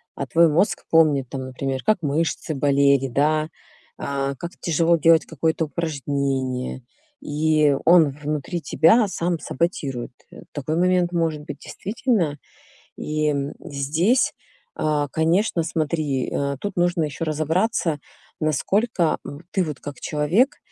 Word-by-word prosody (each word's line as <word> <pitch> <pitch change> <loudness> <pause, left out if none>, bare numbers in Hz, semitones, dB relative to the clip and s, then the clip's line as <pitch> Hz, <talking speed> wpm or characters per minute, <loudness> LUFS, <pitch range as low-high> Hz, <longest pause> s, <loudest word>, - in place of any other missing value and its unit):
а 140 - -3
твой 165 +6 +4
мозг 165 +6 +1
помнит 150 -5 +4
там, 135 - -5
например, 130 0 -4
как 215 -4 +2
мышцы 155 +1 -1
болели, 140 -1 +3
да, 155 +4 +1 0.5
а, 140 0 -2
как 170 +6 -6
тяжело 170 +1 +2
делать 165 +1 +4
какое-то 160 +1 -1
упражнение, 140 -5 -2 0.4
и 150 -1 +2
он 165 -4 +6
внутри 150 +3 -4
тебя 205 +10 +4
сам 175 -2 -1
саботирует. 135 -6 -3 0.2
Э, - - -12
такой 155 +2 -2
момент 180 0 +2
может 165 -3 -1
быть, 145 -1 -8
действительно. 200 - -1 0.6
И, 155 0 -1
м, 140 0 -2
здесь, 160 - +1 0.4
а, 150 -2 0
конечно, 165 +4 +1
смотри, 155 -4 -1
а, 140 0 -1
тут 205 +6 -5
нужно 175 -1 +2
ещё 155 +2 -3
разобраться, 160 +2 0 0.4
насколько 170 - +1
в 145 +2 -8
ты 190 - +1
вот 150 -4 -6
как 145 -1 -8
человек, 165 - +1
155 Hz, 130 wpm, -23 LUFS, 140-170 Hz, 0.6 s, он